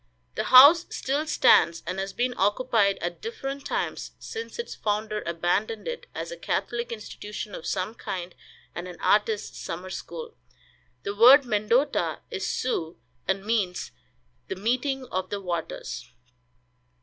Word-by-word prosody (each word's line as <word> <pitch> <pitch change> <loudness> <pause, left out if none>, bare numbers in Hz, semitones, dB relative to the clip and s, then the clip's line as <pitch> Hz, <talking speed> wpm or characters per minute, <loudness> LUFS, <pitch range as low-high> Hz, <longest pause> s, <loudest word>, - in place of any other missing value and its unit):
The - - -2
house 285 +7 +9
still 285 +4 -1
stands, 170 - +4
and 190 - -3
has 195 0 -3
been 245 +5 -1
occupied 205 -1 +2
at 175 0 -3
different 280 -11 -5
times - - -3
since 450 0 -7
its 470 - -4
founder 215 0 -2
abandoned 175 +6 -1
it 485 0 -5
as - - -4
a - - -6
Catholic 240 - -2
institution 210 -1 -7
of - - -6
some 190 +3 -1
kind 180 -5 -5 0.4
and 175 +1 -5
an 175 -2 -9
artists' 210 0 +1
summer 180 +3 -6
school. 475 - -7 0.7
The 200 - -3
word 255 +6 +8
Mendota 230 +5 +1
is - - -3
Sioux, 165 - -2 0.3
and 190 +1 0
means 210 -5 -1 0.6
"The - - -3
meeting 255 +6 -1
of 185 0 -2
the 205 - -3
waters." 170 -4 -5
215 Hz, 140 wpm, -26 LUFS, 190-260 Hz, 0.7 s, house